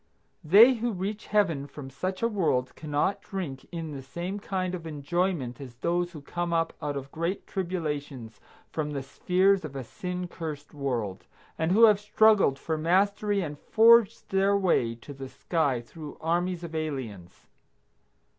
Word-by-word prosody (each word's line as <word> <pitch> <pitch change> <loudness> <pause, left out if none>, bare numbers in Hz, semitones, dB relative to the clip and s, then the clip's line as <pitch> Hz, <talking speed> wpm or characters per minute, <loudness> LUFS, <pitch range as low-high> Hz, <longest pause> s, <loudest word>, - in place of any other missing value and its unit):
They 210 +11 +8
who 235 -1 -2
reach 200 +3 -4
Heaven 165 -10 +1
from 140 -2 -9
such 185 - -4
a - - +5
world 160 - 0
cannot 150 +5 -1
drink 160 -9 -5
in 165 -3 -5
the 140 -2 -6
same 175 +9 -5
kind 185 -2 -2
of 170 -2 -5
enjoyment 150 -3 -2
as 125 -3 -9
those 175 +6 -1
who 155 -4 -9
come 175 +3 -3
up 165 -1 +1
out 145 -1 -2
of 135 0 -7
great 170 +4 -3
tribulations 150 - -4 0.3
from 150 -2 -3
the 140 -2 -3
spheres 185 +7 +2
of 145 -3 -7
a 135 - -4
sin 180 +8 -5
cursed 155 -4 -7
world, 120 -9 -3 0.3
and 160 +2 0
who 220 +5 +5
have 210 -3 +7
struggled 210 -8 +4
for 160 +2 -3
mastery 200 +4 +2
and 150 -4 -5
forged 230 -1 +5
their 195 +1 +3
way 145 -12 +2
to 130 +5 -11
the 135 -1 -8
sky 145 -8 0
through 150 +5 -10
armies 175 +2 -1
of 165 -1 -7
aliens. 130 - -5
165 Hz, 165 wpm, -27 LUFS, 140-190 Hz, 0.3 s, They